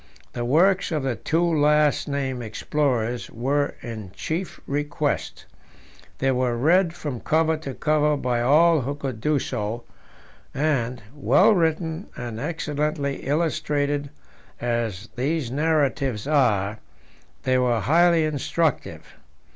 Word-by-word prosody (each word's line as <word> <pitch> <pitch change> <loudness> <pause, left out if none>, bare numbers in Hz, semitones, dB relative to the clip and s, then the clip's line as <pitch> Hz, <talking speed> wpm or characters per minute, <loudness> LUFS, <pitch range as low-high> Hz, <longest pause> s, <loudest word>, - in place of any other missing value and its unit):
The 120 - -3
works 180 +10 +3
of 155 -4 -1
the 130 -3 -1
two 165 +8 0
last 150 -3 +3
named 135 -3 -2
explorers 120 0 -1
were 140 +5 -1
in 110 -6 -7
chief 170 - -4
request; 145 +1 -2 0.7
they 135 0 +1
were 125 -2 0
read 170 +6 +3
from 140 -8 -5
cover 160 +4 +2
to 140 -4 -7
cover 150 -1 +2
by 125 -3 -1
all 155 +5 +5
who 140 +3 -3
could 135 -6 -5
do 150 +3 +2
so, 115 -3 -3 0.7
and, 130 -5 0
well 145 - +4
written 165 0 0
and 120 -3 -5
excellently 150 -2 -2
illustrated 145 -2 0 0.5
as 115 -4 -2
these 135 0 -1
narratives 140 -6 0
are, 110 -8 +2 0.6
they 130 0 +2
were 120 -2 +2
highly 170 +3 +4
instructive. 155 +1 -2
145 Hz, 120 wpm, -24 LUFS, 125-155 Hz, 0.7 s, all